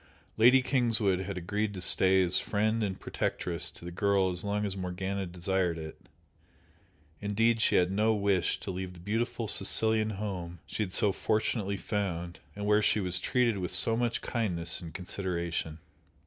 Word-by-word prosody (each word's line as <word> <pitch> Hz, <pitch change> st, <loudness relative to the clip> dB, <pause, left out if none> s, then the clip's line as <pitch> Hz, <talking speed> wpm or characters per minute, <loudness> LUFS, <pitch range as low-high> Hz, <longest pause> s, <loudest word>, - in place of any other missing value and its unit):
Lady 125 Hz, +4 st, +5 dB
Kingswood 115 Hz, -8 st, +1 dB
had 95 Hz, 0 st, -5 dB
agreed 100 Hz, +4 st, -3 dB
to -, -, -5 dB
stay 95 Hz, +1 st, +6 dB
as 90 Hz, 0 st, +1 dB
friend 110 Hz, +2 st, -1 dB
and 95 Hz, -3 st, -3 dB
protectress 85 Hz, -1 st, -3 dB
to -, -, -13 dB
the 85 Hz, -, -6 dB
girl 95 Hz, 0 st, +1 dB
as 90 Hz, -, -3 dB
long 105 Hz, +1 st, -1 dB
as 100 Hz, -2 st, -3 dB
Morgana 95 Hz, +1 st, -4 dB
desired 90 Hz, 0 st, -1 dB
it, 80 Hz, -1 st, -10 dB, 1.1 s
indeed 110 Hz, +3 st, +1 dB
she -, -, +3 dB
had 90 Hz, 0 st, +3 dB
no 105 Hz, +3 st, +2 dB
wish 100 Hz, -3 st, 0 dB
to 95 Hz, -, -5 dB
leave 95 Hz, 0 st, -6 dB
the 90 Hz, -, -14 dB
beautiful 110 Hz, +4 st, -2 dB
Sicilian 110 Hz, +1 st, +2 dB
home 90 Hz, -4 st, -5 dB
she -, -, -5 dB
had 100 Hz, -4 st, -2 dB
so 105 Hz, +1 st, +2 dB
fortunately 105 Hz, -1 st, -1 dB
found, 90 Hz, -5 st, -4 dB, 0.2 s
and 105 Hz, 0 st, -5 dB
where 105 Hz, +1 st, +3 dB
she 105 Hz, -, +2 dB
was 90 Hz, -2 st, -1 dB
treated 120 Hz, -1 st, +1 dB
with 90 Hz, -2 st, -3 dB
so 95 Hz, +6 st, +6 dB
much 120 Hz, 0 st, -1 dB
kindness 90 Hz, -8 st, -1 dB
and 85 Hz, -2 st, -8 dB
consideration. 85 Hz, -4 st, -3 dB
100 Hz, 170 wpm, -29 LUFS, 90-110 Hz, 1.1 s, stay